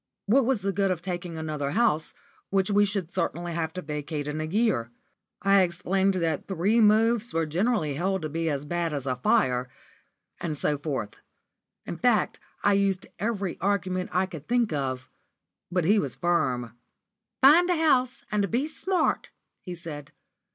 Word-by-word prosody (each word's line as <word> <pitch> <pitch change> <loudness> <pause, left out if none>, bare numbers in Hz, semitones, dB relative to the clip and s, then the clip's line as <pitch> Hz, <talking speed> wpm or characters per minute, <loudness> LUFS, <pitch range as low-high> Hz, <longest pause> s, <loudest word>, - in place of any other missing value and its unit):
What 245 +5 +4
was 255 -7 +1
the 195 - +1
good 195 +1 +1
of 175 -2 -2
taking 175 -2 -4
another 155 -3 -3
house, 160 -10 +1 0.3
which 195 0 +1
we 205 0 +5
should 195 -4 -3
certainly 175 -1 -2
have 160 -1 -2
to 185 - -5
vacate 150 0 -4
in 150 +1 -3
a - - -2
year? 185 - +1 0.5
I 195 0 +5
explained 190 +2 +1
that 165 -4 -1
three 200 +5 +2
moves 225 +1 +3
were 165 0 +2
generally 175 -1 0
held 185 +4 -1
to 155 - -2
be 165 +2 -1
as 145 -1 -2
bad 170 0 -1
as 140 -2 -3
a 130 -2 -1
fire, 125 0 +2 0.7
and 155 -3 -3
so 145 0 0
forth. 130 -9 -4 0.7
In - - -5
fact, - - +2 0.2
I 205 - +4
used 195 -1 +1
every 200 -4 -2
argument 185 -2 0
I 185 +1 +2
could 160 -6 -10
think 240 -6 +1
of, 130 -3 -2 0.6
but 180 -2 +1
he 205 +4 +4
was - - -3
firm. 125 -9 0 0.7
"Find 335 +6 +7
a 355 - +3
house, 260 -6 +2
and 205 -2 +1
be 255 - 0
smart," 365 +4 -1 0.3
he 180 -2 -7
said. 155 -4 -8
180 Hz, 170 wpm, -27 LUFS, 155-205 Hz, 0.7 s, Find